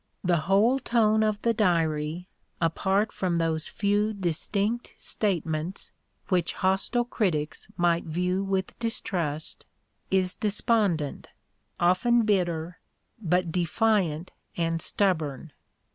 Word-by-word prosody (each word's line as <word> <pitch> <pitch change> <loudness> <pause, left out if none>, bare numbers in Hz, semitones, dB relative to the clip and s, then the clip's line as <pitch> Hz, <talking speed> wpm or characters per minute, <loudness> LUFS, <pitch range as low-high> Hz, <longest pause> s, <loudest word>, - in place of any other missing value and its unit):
The 175 -2 +3
whole 220 +7 +4
tone 220 -3 +2
of 215 -1 +1
the 230 - +3
Diary, 165 -4 0 0.3
apart 190 +5 +1
from 180 -2 -1
those 160 -1 0
few 205 +1 0
distinct 200 +5 -2
statements 170 -3 -2 0.4
which 180 -2 +1
hostile 195 +6 0
critics 170 -11 -2
might 175 -1 +2
view 180 +4 -1
with 190 -1 -2
distrust, 170 -9 -1 0.5
is 185 -1 +2
despondent, 205 -7 0 0.5
often 205 +7 +3
bitter, 175 -5 0 0.4
but 180 -2 +1
defiant 180 -2 +1 0.3
and 165 -1 0
stubborn. 160 -8 -1
185 Hz, 100 wpm, -27 LUFS, 165-210 Hz, 0.5 s, whole